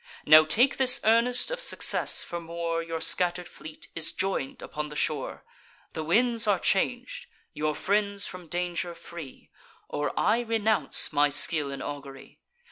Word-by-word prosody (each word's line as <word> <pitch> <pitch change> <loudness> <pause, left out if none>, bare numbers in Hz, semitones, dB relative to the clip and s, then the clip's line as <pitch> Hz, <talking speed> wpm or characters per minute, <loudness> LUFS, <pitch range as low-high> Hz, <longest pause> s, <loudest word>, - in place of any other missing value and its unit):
Now 155 +1 +8
take 240 - +2
this 255 -2 +5
earnest 235 - +2
of - - -3
success, - - +2
for 170 0 -6
more: 165 0 -3
Your 165 0 -5
scatter'd 175 +2 +1
fleet 155 0 -11
is 160 -1 -3
join'd 190 -8 -3
upon 150 0 -6
the 150 - -10
shore; 150 -2 -3 0.5
The 160 - -4
winds 230 +6 +1
are 205 -2 +3
chang'd, 245 +8 -2 0.3
your 150 0 -2
friends 200 +3 0
from 180 -2 -9
danger 175 +1 -3
free; 165 -7 -11 0.4
Or 145 - -3
I 230 - +2
renounce 220 -7 0
my 145 0 +3
skill 145 0 +3
in 140 - -6
augury. 140 -2 -9
170 Hz, 150 wpm, -27 LUFS, 155-215 Hz, 0.5 s, Now